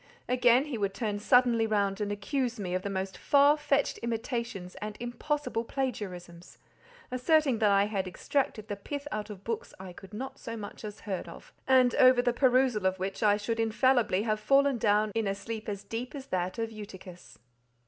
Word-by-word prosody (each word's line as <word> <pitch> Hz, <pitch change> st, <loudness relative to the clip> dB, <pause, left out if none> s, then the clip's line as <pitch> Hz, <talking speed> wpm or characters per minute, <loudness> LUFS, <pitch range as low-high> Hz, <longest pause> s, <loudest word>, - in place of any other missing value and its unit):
Again, 250 Hz, +1 st, +4 dB
he 270 Hz, -7 st, -4 dB
would 195 Hz, -1 st, -1 dB
turn 210 Hz, -4 st, -2 dB
suddenly 235 Hz, 0 st, +4 dB
round 200 Hz, -1 st, 0 dB
and 205 Hz, 0 st, -1 dB
accuse 245 Hz, +3 st, -2 dB
me 180 Hz, -3 st, -3 dB
of 185 Hz, -, 0 dB
the 200 Hz, -, -4 dB
most 190 Hz, -1 st, -3 dB
far 285 Hz, +1 st, +5 dB
fetched 290 Hz, -2 st, 0 dB
imitations 235 Hz, -5 st, -4 dB
and 210 Hz, 0 st, -5 dB
impossible 240 Hz, +1 st, -2 dB
plagiarisms, 185 Hz, -10 st, -5 dB, 0.5 s
asserting 260 Hz, -1 st, +2 dB
that 215 Hz, -2 st, +4 dB
I 200 Hz, 0 st, +4 dB
had 200 Hz, -3 st, -2 dB
extracted 215 Hz, +2 st, -2 dB
the 205 Hz, -, -3 dB
pith 285 Hz, +8 st, -6 dB
out 215 Hz, 0 st, -4 dB
of 200 Hz, -2 st, -9 dB
books 230 Hz, 0 st, -4 dB
I 185 Hz, -1 st, -8 dB
had 195 Hz, 0 st, -13 dB
not 255 Hz, +6 st, -6 dB
so 230 Hz, 0 st, -6 dB
much 205 Hz, 0 st, -8 dB
as 210 Hz, -1 st, -7 dB
heard 195 Hz, -4 st, -4 dB
of—and 255 Hz, -2 st, +1 dB
over 255 Hz, -1 st, +6 dB
the 245 Hz, -1 st, +2 dB
perusal 250 Hz, -5 st, +3 dB
of 190 Hz, 0 st, -1 dB
which 190 Hz, +1 st, -4 dB
I 205 Hz, -2 st, +4 dB
should 225 Hz, +2 st, -3 dB
infallibly 225 Hz, -2 st, +2 dB
have 215 Hz, -1 st, 0 dB
fallen 275 Hz, +3 st, +3 dB
down 210 Hz, 0 st, +2 dB
in 225 Hz, -2 st, 0 dB
a 195 Hz, -, 0 dB
sleep 220 Hz, +2 st, -6 dB
as 200 Hz, -1 st, -5 dB
deep 245 Hz, +4 st, -5 dB
as 270 Hz, -2 st, -7 dB
that 185 Hz, +2 st, -1 dB
of 225 Hz, 0 st, -2 dB
Eutychus. 190 Hz, -4 st, -11 dB
220 Hz, 190 wpm, -29 LUFS, 200-250 Hz, 0.5 s, over